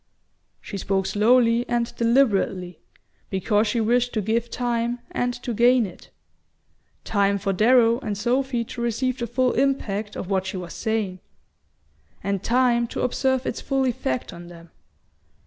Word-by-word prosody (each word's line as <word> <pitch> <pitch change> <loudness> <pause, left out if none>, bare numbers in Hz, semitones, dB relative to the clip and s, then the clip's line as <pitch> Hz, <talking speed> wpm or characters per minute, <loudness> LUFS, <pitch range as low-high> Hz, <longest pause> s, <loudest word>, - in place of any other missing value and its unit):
She 200 - -6
spoke 195 0 0
slowly 230 +3 +3
and 235 -1 -1
deliberately, 200 - +1 0.5
because 205 +3 +1
she 230 +3 0
wished 245 +2 +1
to 215 - 0
give 230 +3 0
time 240 0 -1
and 245 0 0
to 240 - -3
gain 240 +1 +4
it; 180 - -11 0.9
time 200 -1 +1
for 195 0 -1
Darrow 230 +3 +4
and 210 -7 -4
Sophy 245 +2 0
to 235 +1 -8
receive 245 +2 -1
the 235 - -2
full 250 +2 +1
impact 220 -6 -1
of - - -5
what 190 -1 -1
she 190 - -4
was 175 -2 -7
saying, 220 -5 -2 1.0
and 200 -1 -1
time 240 -1 +2
to - - -5
observe 260 +1 0
its - - -3
full 270 -1 0
effect 175 - -2
on 175 0 -10
them. 170 -1 -14
230 Hz, 150 wpm, -24 LUFS, 200-245 Hz, 1.0 s, gain